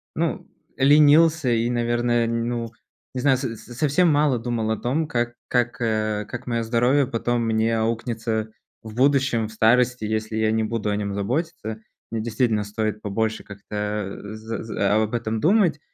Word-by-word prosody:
ну - - -2 0.3
ленился 150 +1 +5
и, 115 0 +1
наверное, 120 0 +1
ну, 115 0 -2 0.4
не 130 - -3
знаю, 135 -1 +4
со 125 -3 -4
совсем 145 +10 +1
мало 145 -4 +3
думал 115 -1 -2
о 110 - 0
том, 145 +8 -1
как 120 -4 -1
как 120 -1 0
как 110 0 -2
моё 115 -1 -1
здоровье 120 +4 +2
потом 120 -1 -1
мне 115 0 +1
аукнется 110 -1 -2 0.3
в 110 -1 -9
будущем, 135 -3 +2
в - - -12
старости, 120 +2 +3
если 110 0 -2
я 110 0 +2
не 110 0 +1
буду 110 -1 -2
о 105 - 0
нём 100 -1 -3
заботиться. 115 - -3 0.3
Мне 115 - -2
действительно 110 -2 0
стоит 105 0 -3
побольше 110 +2 -2
как-то, 105 0 -5
э, 105 +1 -8
за 110 +1 -6
за 105 -2 0
об 110 +1 -2
этом 110 -2 -2
думать, 175 - +3
115 Hz, 160 wpm, -23 LUFS, 110-125 Hz, 0.4 s, ленился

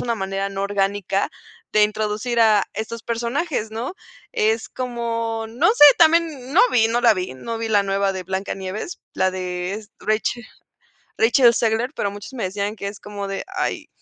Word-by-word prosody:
una 235 -1 -1
manera 195 -1 -2
no 195 0 -4
orgánica 200 -1 0 0.4
de 215 - +4
introducir 215 +3 0
a 215 -3 +5
estos 225 +1 -5
personajes, 235 +2 -2
¿no? 230 +7 -4 0.4
Es 220 +1 0
como, 230 -2 -3
no 230 +2 +1
sé, 440 -9 +7
también 315 -5 +3
no 365 - +7
vi, 225 -2 +4
no 240 +1 0
la 235 -2 +7
vi, 185 -9 -4
no 225 - -5
vi 225 0 -3
la 205 -2 +4
nueva 195 0 0
de 190 - -4
Blanca 190 +2 -3
Nieves, 195 - -6
la 185 - +1
de 180 0 -3
es 215 +1 -9
Rachel 220 +2 -1 0.7
Rachel 235 +1 +5
Zegler, 230 +3 0
pero 200 - -1
muchos 205 +6 -9
me 235 - -4
decían 200 +3 -3
que 200 - -4
es 200 0 -9
como 205 -1 -6
de: 195 0 -4
"Ay,", 370 - -2
220 Hz, 180 wpm, -22 LUFS, 200-235 Hz, 0.7 s, sé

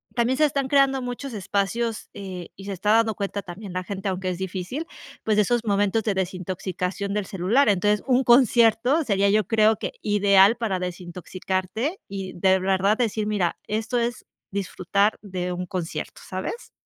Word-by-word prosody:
también 240 +2 +2
se 305 - +3
están 275 -2 0
creando 275 -1 +3
muchos 250 +2 -5
espacios, 210 +3 -2
eh, 185 -3 -7
y 195 - -10
se 200 - -4
está 195 +3 0
dando 225 -1 +3
cuenta 200 0 -3
también 195 +1 -9
la 185 0 -2
gente, 195 +1 -3
aunque 185 0 -2
es 180 - -3
difícil, 190 - -4 0.4
pues, 215 -1 +1
de 210 - +5
esos 240 +3 +1
momentos 205 +1 +1
de 210 - 0
desintoxicación 185 +1 -3
del 210 -1 -1
celular, 200 +9 +2
entonces, 205 +1 +2
un 260 0 +3
concierto 240 +3 +4
sería, 200 -3 +2
yo 210 -2 +2
creo 220 0 +4
que - - -4
ideal 200 +1 +5
para 220 -5 -1
desintoxicarte 185 - -4
y 195 -1 -5
de 190 +1 +3
verdad 195 +2 +2
decir: 220 -3 0
"mira, 200 -5 0
esto 220 +3 -2
es 235 -1 -2 0.3
disfrutar 200 +1 0
de 180 -3 -4
un 180 +1 -4
concierto", 175 -2 -5
¿sabes? 190 - -5
200 Hz, 170 wpm, -24 LUFS, 185-225 Hz, 0.4 s, de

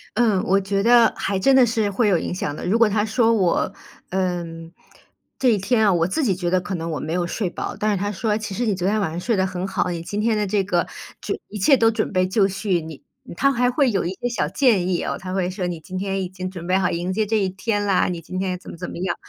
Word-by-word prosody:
嗯， 220 -6 +3
我 195 +2 +3
觉 195 0 -1
得 235 +1 +5
还 195 - -1
真 265 +8 +4
的 260 -2 +7
是 220 -3 0
会 215 +3 +1
有 190 -4 +4
影 - - -3
响 150 -5 -3
的。 - - -6
如 195 +6 +2
果 230 -2 +5
它 210 0 +1
说 230 +1 +2
我， 190 -2 +1 0.4
嗯， 170 -3 -3 0.7
这 260 - +3
一 220 - +3
天 220 +4 +1
啊， 200 - +4
我 170 -1 +2
自 300 - -1
己 200 -8 +2
觉 175 -1 -2
得 185 +1 +2
可 190 - -5
能 165 -1 -4
我 155 - -3
没 155 - -4
有 175 0 0
睡 190 +1 -2
饱， - - -5
但 215 0 0
是 205 - 0
它 205 +2 -2
说 210 +1 -1
其 215 -3 -5
实 245 - -1
你 215 - +1
昨 185 -1 -2
天 215 +2 +1
晚 195 -6 -1
上 165 - -4
睡 230 +5 0
得 190 -1 +2
很 185 0 -3
好， 195 - -1
你 170 -1 -4
今 200 +5 -4
天 220 +1 +2
的 210 -1 0
这 195 0 +1
个 180 -3 0 0.3
这 - - -3
一 210 - -6
切 270 +8 +5
都 225 -1 +4
准 225 - -2
备 185 -2 +2
就 195 +1 +3
绪， 190 -2 -1
你 160 -1 -8 0.3
嗯 - - -9
它 275 +8 +3
还 245 -1 +2
会 260 0 +2
有 195 - 0
一 175 - -1
些 245 - 0
小 210 -11 -1
建 195 - +2
议 180 -2 0
哦， - - -2
它 185 0 -6
会 185 -2 0
说 185 -1 -3
你 175 -2 -4
今 185 +4 -7
天 195 0 -2
已 180 - -5
经 185 0 -6
准 175 -2 -8
备 185 +2 +2
好 190 - +1
迎 175 +2 -2
接 215 +2 0
这 220 +2 +1
一 195 -3 +1
天 205 +2 -2
啦， 195 -2 +2
你 175 -2 -4
今 185 +3 -6
天 185 -1 -1
怎 180 - -11
么 - - -10
怎 180 - -6
么 - - -7
样。 180 -1 -1
195 Hz, 315 characters per minute, -22 LUFS, 180-215 Hz, 0.7 s, 的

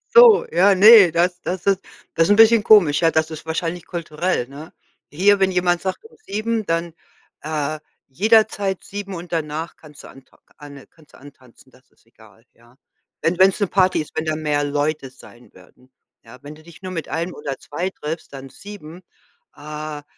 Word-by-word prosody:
So, 470 -2 +7
ja, 190 +4 +4
ne, 205 -2 +8
das 175 +2 0
das 180 0 -5
ist 195 -2 +2 0.3
das 165 0 +2
ist - - -5
'n - - +5
bisschen 225 0 +6
komisch, 180 -11 +5
ja. 165 - +4
Das 160 0 -1
ist 160 +1 -10
wahrscheinlich 165 +1 -4
kulturell, 170 -4 -3
ne? 145 +4 -12 0.4
Hier, 200 +6 +3
wenn 190 0 +2
jemand 175 -1 0
sagt, 190 - -5
um 450 - -17
7:00, 215 +1 -3
dann, 165 0 -2 0.5
äh, 155 0 -4 0.3
jederzeit 205 - +1
7:00 195 -1 -7
und 175 +1 -10
danach 160 0 -4
kannst 150 -2 -16
du - - -12
antau 135 - -19
k - - -30
anne 140 -2 -13
kannst 155 -2 -25
du - - -16
antanzen, 130 -2 -19
das 125 -1 -25
ist - - -34
egal, 115 0 -22
ja, 120 +2 -25 0.5
wenn 170 +2 0
wenn's 190 +2 +4
'ne 200 - +1
Party 185 -3 +1
ist, 150 - -10
wenn 160 - -3
da 155 0 -1
mehr 150 -2 -1
Leute 145 -1 -2
sein 125 -2 -18
werden, 110 +8 -22 0.3
ja? 115 +2 -15
Wenn 145 +1 -10
du 155 - -17
dich 170 +4 -17
nur 185 - -6
mit 165 -3 -6
1 170 +2 -4
oder 135 -2 -6
2 175 +6 -5
triffst, 160 -4 -8
dann 135 0 -10
7:00, 180 +1 -12 0.5
äh, 150 0 -8
165 Hz, 195 wpm, -20 LUFS, 145-190 Hz, 0.5 s, ne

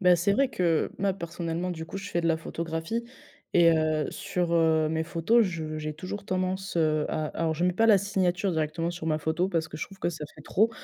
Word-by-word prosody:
Bah, 180 -2 +6
c'est 185 +4 +2
vrai 275 +5 +3
que 170 -8 +1
ma 195 -1 +1
personnellement 170 0 -3
du 160 -2 -5
coup, 195 - -8
je 195 +1 -6
fais 175 -3 0
de 165 - +1
la 165 - +3
photographie 165 +7 -3 0.5
et 170 -1 +7
heu, 155 -2 +1
sur, 175 -2 -2
heu, 160 -1 +3
mes 160 +1 0
photos, 170 +8 +3
je 160 -4 -4
j'ai 155 0 -3
toujours 185 +5 -6
tendance, 185 0 -2
heu, 155 -2 +2
à 155 - -1
alors 160 0 -1
je 170 - 0
mets 180 - +3
pas 225 +5 +3
la 210 -3 +7
signature 190 -1 0
directement 160 +1 -1
sur 175 -2 -6
ma 155 -1 +1
photo 160 +4 0
parce 165 -4 0
que 155 - -9
je 155 - -3
trouve 195 -1 -15
que - - 0
ça 155 -2 -6
fait 150 - -13
trop, 220 +7 +2
170 Hz, 240 wpm, -27 LUFS, 160-185 Hz, 0.5 s, et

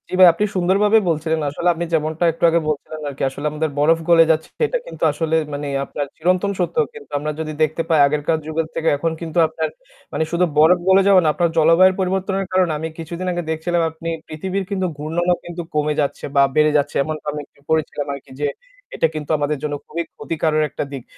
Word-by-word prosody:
জি - - -10
ভাই, 185 - +10
আপনি 205 +5 0
সুন্দরভাবেই 200 +4 +3
বলছিলেন। 160 0 0
আসলে 160 +5 -3
আপনি 170 +1 -3
যেমনটা 160 +1 0
একটু 165 - -11
আগে 170 +1 +3
বলছিলেন 155 +1 -4
আরকি। 140 - -5
আসলে 140 +2 -8
আমাদের 155 +1 -1
বরফ 160 +3 +4
গলে 165 -1 +7
যাচ্ছে 160 0 -1
সেটা 470 +2 +1
কিন্তু - - -8
আসলে 160 +2 -1 0.2
মানে 145 0 -4 0.2
আপনার 145 - -4
চিরন্তন 185 +4 +1
সত্য। 175 - -1 0.2
কিন্তু 455 -1 -13
আমরা 150 +1 -3
যদি 155 -1 -3
দেখতে 155 +2 0
পাই 160 -2 +4
আগেরকার 150 +2 0
যুগের 160 0 -2
থেকে 165 0 -2
এখন 165 +3 -1
কিন্তু 165 0 -5
আপনার - - -3 0.4
মানে - - 0
শুধু 175 +1 +2
বরফ 165 +4 +6
গলে 190 +1 +6
যাওয়া 195 -2 +6
না - - +2
আপনার 170 +1 +1
জলবায়ুর 165 +4 +5
পরিবর্তনের 190 +1 -1
কারণে 185 -3 +3
আমি 160 +2 -3
কিছুদিন 170 +3 -5
আগে 175 0 -2
দেখছিলাম 170 +2 0
আপনি 165 +1 -6 0.2
পৃথিবীর 190 +5 -3
কিন্তু 190 -2 0
ঘূর্ণনও 170 +4 0
কিন্তু 175 0 -6
কমে 150 0 +1
যাচ্ছে 140 - -3
বা 140 - +6
বেড়ে 155 0 +4
যাচ্ছে 145 - -1
এমনটা 155 +1 -6
আমি 150 - -5
একটু - - -31
পড়েছিলাম 155 -2 -1
আরকি 140 -1 -10
যে 145 - +2 0.5
এটা - - +2
কিন্তু 150 0 -4
আমাদের 145 +1 -1
জন্য 150 -1 -2
খুবই 170 +2 -4
ক্ষতিকারক 155 -1 -1
একটা - - -4
দিক। 135 -3 -6
160 Hz, 205 wpm, -20 LUFS, 150-180 Hz, 0.5 s, ভাই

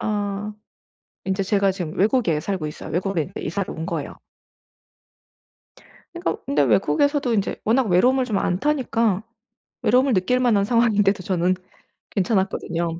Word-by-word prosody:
아 205 0 -2 0.7
인제 190 +1 0
제가 195 0 +2
지금 175 -4 -5
외국에 205 - +2
살고 185 0 -3
있어요. 150 - -8
외국에 175 -3 -1
이사를 185 +4 -3
온 160 - -5
거예요. - - -4 2.0
그니까 345 +1 -2
근데 145 +1 +2
외국에서도 235 - +2
이제 200 -2 -1
워낙 240 +5 +3
외로움을 250 +9 +3
좀 215 -5 -1
안 180 - 0
타니까 230 -8 +1 0.6
외로움을 255 +3 +3
느낄 190 +7 +2
만한 225 -6 +3
상황인데도 210 -4 +2
저는 180 -1 +1 0.6
괜찮았거든요. 175 -4 -1
200 Hz, 320 characters per minute, -22 LUFS, 180-235 Hz, 2.0 s, 워낙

